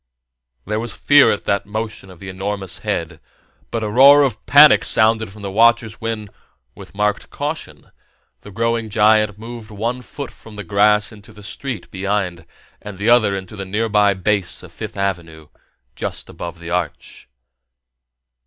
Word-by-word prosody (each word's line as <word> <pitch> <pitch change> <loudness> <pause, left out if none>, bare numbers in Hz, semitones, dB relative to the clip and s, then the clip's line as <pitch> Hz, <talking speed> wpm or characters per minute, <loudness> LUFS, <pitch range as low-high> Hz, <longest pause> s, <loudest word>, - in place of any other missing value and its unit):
There 105 +2 -2
was 115 -1 -4
fear 145 -1 +5
at 105 - -1
that 100 0 0
motion 110 -2 -5
of 90 - -13
the 95 - -11
enormous 95 0 -4
head, 80 -1 -3 0.5
but 115 -1 -3
a - - -1
roar 140 +6 +7
of 120 -6 -2
panic 145 +1 +7
sounded 110 -1 +2
from 105 +1 -13
the 100 - -4
watchers 115 +2 +3
when, 110 -2 -4 0.4
with - - -14
marked 105 0 -1
caution, 145 - -6 0.5
the - - -13
growing 115 +2 -1
giant 105 -1 +3
moved 115 0 -9
one 115 +4 -3
foot 140 +2 -8
from 110 - -15
the 105 - -6
grass 105 +3 +2
into 105 0 -15
the 105 -1 -15
street 125 +3 -6
behind 95 -3 -3 0.3
and 105 -2 -9
the 105 +4 0
other 110 -5 +4
into 95 +2 -7
the 100 - -5
nearby 105 0 +1
base 95 0 -1
of - - -12
Fifth - - -8
Avenue, 85 -6 -4 0.5
just - - -6
above 85 -1 -7
the 85 0 -8
Arch. 85 -3 -4
105 Hz, 160 wpm, -19 LUFS, 95-115 Hz, 0.5 s, roar